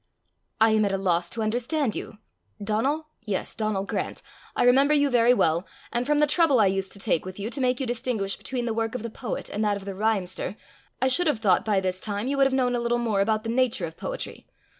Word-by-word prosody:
"I 220 0 +5
am 215 0 +3
at 200 - +1
a 195 - 0
loss 175 -2 +1
to 225 - -3
understand 245 +3 0
you 215 - -6 0.4
Donal? 265 +10 -1
yes, 205 -4 -2
Donal 215 -3 -1
Grant. - - -4 0.3
I - - +2
remember 275 +4 +5
you 285 -1 +2
very 240 0 +5
well; 170 -7 +2 0.2
and 240 +2 -1
from 295 0 +3
the 300 - +5
trouble 295 -3 +3
I 210 - +5
used 190 0 0
to - - -4
take 195 -5 +1
with 185 0 -8
you 210 +4 -4
to 270 - -2
make 250 -1 +1
you 265 - -1
distinguish 235 -5 -1
between 250 -3 -4
the 230 - -1
work 225 +1 -2
of 250 - -4
the 230 - -5
poet 230 -2 -5
and 210 - -2
that 205 -1 +1
of 195 - -10
the 200 - -4
rhymester, 195 -2 -1 0.4
I 260 - +2
should 345 +7 +3
have 295 - +2
thought 205 -4 +3
by 210 -3 +2
this 185 -1 -2
time 205 +2 -2
you 280 - 0
would 275 -1 +5
have - - -3
known 250 -2 +2
a - - 0
little 235 0 0
more 225 -4 +1
about 215 +1 +1
the 225 - -4
nature 240 -6 +1
of 160 -1 -8
poetry. - - -6
225 Hz, 245 wpm, -26 LUFS, 200-255 Hz, 0.4 s, I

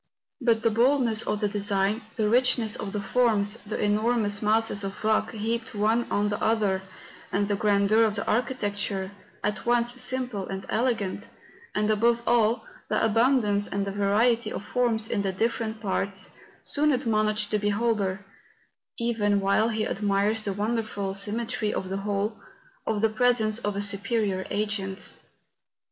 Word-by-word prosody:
But 230 -3 +2
the 230 - +3
bold¬ 255 +5 +3
ness 225 -2 +2
of 210 -1 -2
the 210 - +2
design, 205 +1 +1
the 215 -3 +1
richness 235 -1 +3
of 210 -6 -4
the 210 - -2
forms, 210 0 +2
the 210 -2 -6
enormous 210 0 +1
masses 215 -1 +1
of 195 +2 -6
rock 215 0 +1
heaped 225 +1 -3
one 220 +3 +1
on 205 0 +1
the 205 - -3
other, 210 -4 +1 0.5
the 205 +1 0
grandeur 205 0 +3
of 215 -2 -1
the 200 - -2
architecture, 205 -5 -1 0.3
at 210 0 -1
once 240 +1 +2
simple 250 -6 -2
and 190 0 -5
elegant, 225 -5 -1 0.5
and, 210 0 +1
above 235 +2 +2
all, 235 0 +2 0.2
the - - +2
abundance 225 -3 +2
and 200 0 -2
the 200 - -3
variety 210 +4 +2
of 205 - -5
forms 225 -2 0
in 210 - -1
the 195 -1 -1
different 220 +2 -2
parts, 195 -2 -1 0.3
soon 300 +1 +1
ad¬ 260 -2 0
monish 215 -1 +1
the 210 - +1
beholder—even 205 +1 -2
while 200 +3 +2
he 215 -1 -1
admires 205 +2 0
the 200 -2 -2
wonderful 205 -2 -2
symmetry 210 +2 -1
of 185 - -4
the 195 - -2
whole,— 205 +2 -2 0.5
of 215 -2 0
the 225 - +3
presence 220 -1 +2
of 205 -4 -2
a 200 - -1
superior 200 -1 0
Agent. 205 -2 -2
215 Hz, 155 wpm, -26 LUFS, 200-230 Hz, 0.5 s, the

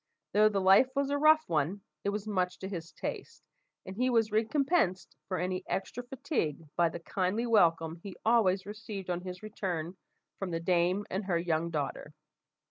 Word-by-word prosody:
Though 215 +1 +6
the 200 -2 0
life 195 +7 +6
was 280 0 0
a 285 - +1
rough 310 +1 +5
one, 165 +5 0 0.2
it 200 - +1
was 205 +1 -3
much 185 -3 0
to 190 - -6
his 170 -3 -6
taste; 460 - -6 0.4
and 190 - -7
he 250 +4 +1
was 225 -3 +2
recompensed 220 - +1
for 185 - -2
any 185 +1 -2
extra 195 +5 -3
fatigue 245 - -3
by 170 -1 +3
the 165 - -7
kindly 190 +6 -1
welcome 165 -7 +3
he 185 +2 -9
always 200 -5 +3
received 205 -3 -6
on 175 0 -2
his 180 +1 -7
return 180 -5 -4 0.4
from 195 - -3
the 165 -1 -2
dame 180 +3 +1
and 190 +2 -2
her 180 -3 +1
young 170 -1 0
daughter. 150 -1 -4
190 Hz, 180 wpm, -31 LUFS, 175-220 Hz, 0.4 s, Though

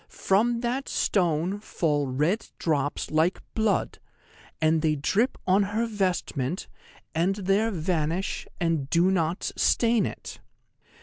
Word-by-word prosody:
From 230 +5 +1
that 250 +3 -2
stone 180 +1 +1
fall 150 -8 -1
red 150 - 0
drops 145 -3 -1
like 160 +4 +2
blood, 220 -2 0 0.6
and 160 0 +3
they 155 -1 +2
drip 205 - +1
on 190 +2 +4
her 210 +4 0
vestment, 185 - -2 0.5
and 175 +4 +1
there 200 +3 +1
vanish, 170 -1 -2
and 165 -5 0
do 175 +4 +3
not 170 -1 0
stain 230 -1 +3
it. - - -8
180 Hz, 120 wpm, -26 LUFS, 155-205 Hz, 0.6 s, on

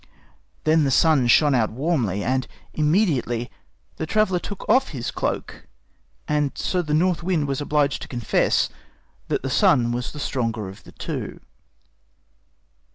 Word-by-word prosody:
Then 155 0 +4
the 140 - +2
Sun 135 -2 +4
shined 145 +3 +5
out 110 -3 +2
warmly, 120 - -1
and 130 0 0 0.3
immediately 150 - +1 0.5
the 160 - -3
traveler 200 -2 +2
took 205 +2 -7
off 260 +4 +3
his 125 -6 -4
cloak. - - -4 0.6
And 150 -2 0
so 180 - 0
the 150 -3 -1
North 175 +2 +2
Wind 170 -4 0
was 135 0 -2
obliged 145 -1 +1
to - - -7
confess 120 -4 +1 0.6
that - - -1
the - - -2
Sun 120 -2 +3
was 120 +1 -3
the 150 - -9
stronger 115 -7 -2
of 95 - -12
the - - -13
two. - - -5
145 Hz, 150 wpm, -23 LUFS, 120-165 Hz, 0.6 s, shined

